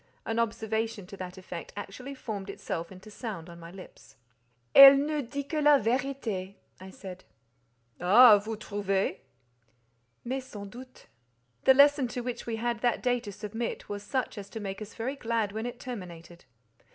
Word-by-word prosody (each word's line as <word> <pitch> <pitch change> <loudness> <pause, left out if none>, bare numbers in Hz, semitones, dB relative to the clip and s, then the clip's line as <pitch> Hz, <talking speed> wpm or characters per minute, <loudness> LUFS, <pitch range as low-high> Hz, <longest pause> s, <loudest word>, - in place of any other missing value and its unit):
An 225 +1 -1
observation 220 -2 -2
to 200 +2 -11
that 185 0 -7
effect 180 -2 -8
actually 250 +8 -7
formed 210 -6 -6
itself 170 -3 -5
into 190 +3 -12
sound 200 -7 -7
on 170 - -12
my 165 0 -10
lips. 185 +1 -14 0.6
"Elle 275 0 +11
ne 295 +1 0
dit 280 +2 -5
que 310 0 -1
la 295 -1 +7
vérité," 230 -6 -2 0.2
I 190 +1 -10
said. 185 -1 -10 0.8
"Ah! 210 +4 +8
vous 220 +2 -5
trouvez?" 200 -2 -1 1.1
"Mais, 260 +2 -3
sans 205 -5 -9
doute." 255 +5 -13 0.6
The 265 - +7
lesson 285 -1 +6
to 245 +1 -5
which 240 -1 -5
we 230 - -2
had 235 +1 -2
that 240 -2 +1
day 245 -1 +2
to 220 -4 -8
submit 225 +3 -5
was 205 0 -4
such 250 0 -3
as 200 - -9
to 225 - -7
make 195 -1 -6
us 215 0 -9
very 250 +5 -3
glad 230 -5 -1
when 220 +3 -4
it 245 0 -7
terminated. 175 -8 -9
225 Hz, 170 wpm, -29 LUFS, 195-250 Hz, 1.1 s, Elle